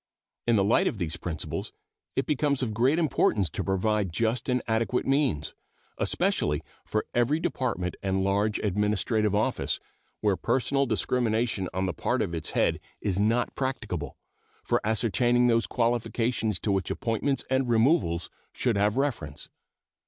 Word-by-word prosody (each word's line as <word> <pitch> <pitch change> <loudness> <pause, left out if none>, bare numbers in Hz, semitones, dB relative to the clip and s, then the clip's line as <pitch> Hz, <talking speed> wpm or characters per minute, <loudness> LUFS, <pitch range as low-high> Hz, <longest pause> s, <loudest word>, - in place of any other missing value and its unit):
In 115 - +4
the 100 - +4
light 105 +4 +3
of - - -1
these 85 -4 -2
principles 85 -2 -5 0.4
it 135 - +1
becomes 140 -1 +1
of 110 -4 -2
great 125 +8 +3
importance 110 - +2
to - - -3
provide 100 0 0
just 115 +7 -1
and 125 0 +1
adequate 115 +2 0
means, 135 - +1 0.5
especially 75 +1 +1 0.2
for 110 - -1
every 120 +6 +2
Department 115 - -2
and 95 0 0
large 100 +2 +1
administrative 105 +1 +1
office, 105 - 0 0.4
where 105 -2 +2
personal 135 +6 +1
discrimination 110 -3 0
on 95 +2 -1
the 90 - -1
part - - 0
of 85 - -4
its 80 -2 -3
head - - +2 0.2
is 100 -2 -1
not 115 +4 +2
practicable, 105 - -3 0.5
for - - +1
ascertaining 120 +3 +2
those 115 -1 +3
qualifications 115 -2 0
to 105 - 0
which 95 -1 0
appointments 130 +2 -1
and 130 -1 +2
removals 115 - +2 0.2
should 120 -5 0
have 105 +3 +2
reference. 115 - -2
110 Hz, 145 wpm, -27 LUFS, 95-125 Hz, 0.5 s, In